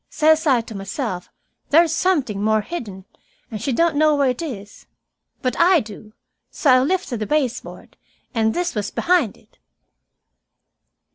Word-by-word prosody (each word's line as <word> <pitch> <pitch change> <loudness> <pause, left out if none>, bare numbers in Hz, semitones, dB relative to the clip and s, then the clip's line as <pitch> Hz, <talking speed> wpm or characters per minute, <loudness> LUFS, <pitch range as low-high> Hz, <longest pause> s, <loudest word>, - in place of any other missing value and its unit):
Says 315 +1 +3
I 255 -4 +4
to 225 - -11
myself, 195 -1 -5 0.4
there's 325 +1 +4
something 280 - 0
more 215 0 +2
hidden, 205 - -7 0.5
and 215 -2 -5
she 270 - -1
don't 335 +4 +2
know 305 0 +3
where 280 -3 +2
it 250 - -6
is. 205 -11 -8 0.6
But 255 - 0
I 355 0 +5
do. 215 -2 -10 0.4
So 285 - +1
I 255 - +6
lifted 280 - -1
the 215 - -3
baseboard, 275 -5 -3 0.4
and 220 -2 +1
this 350 0 -1
was 205 -2 -3
behind 345 - +1
it." - - -28
255 Hz, 150 wpm, -21 LUFS, 215-315 Hz, 0.6 s, I